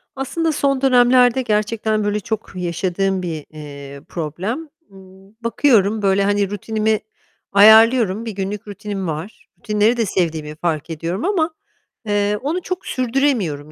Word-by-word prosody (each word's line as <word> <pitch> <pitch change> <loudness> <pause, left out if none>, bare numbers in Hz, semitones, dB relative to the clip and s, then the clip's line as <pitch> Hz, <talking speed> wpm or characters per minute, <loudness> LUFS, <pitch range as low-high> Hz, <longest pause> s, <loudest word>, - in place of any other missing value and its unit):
Aslında 320 +5 -1
son 275 -3 0
dönemlerde 250 -1 +4
gerçekten 215 -1 0
böyle 205 0 0
çok 220 +1 -5
yaşadığım 185 +2 -1
bir, 160 -4 -5
eee, 140 -2 -10
problem. 185 - -4 0.2
Imm, 190 0 -17
bakıyorum 225 -4 +2
böyle, 195 0 +2
hani, 200 -1 +1
rutinimi 215 +1 -1 0.5
ayarlıyorum. 220 +1 +6
Bir 225 - -4
günlük 200 +1 -5
rutinim 205 -2 -5
var. 160 +6 -6
Rutinleri 215 +1 +1
de 230 - +1
sevdiğimi 160 -5 -2
fark 160 -1 -2
ediyorum 165 - -3
ama, 345 -5 +1 0.5
eee, 205 0 +1
onu 315 +7 -2
çok 365 +1 -5
sürdüremiyorum. 235 - -1
205 Hz, 130 wpm, -19 LUFS, 185-235 Hz, 0.5 s, ayarlıyorum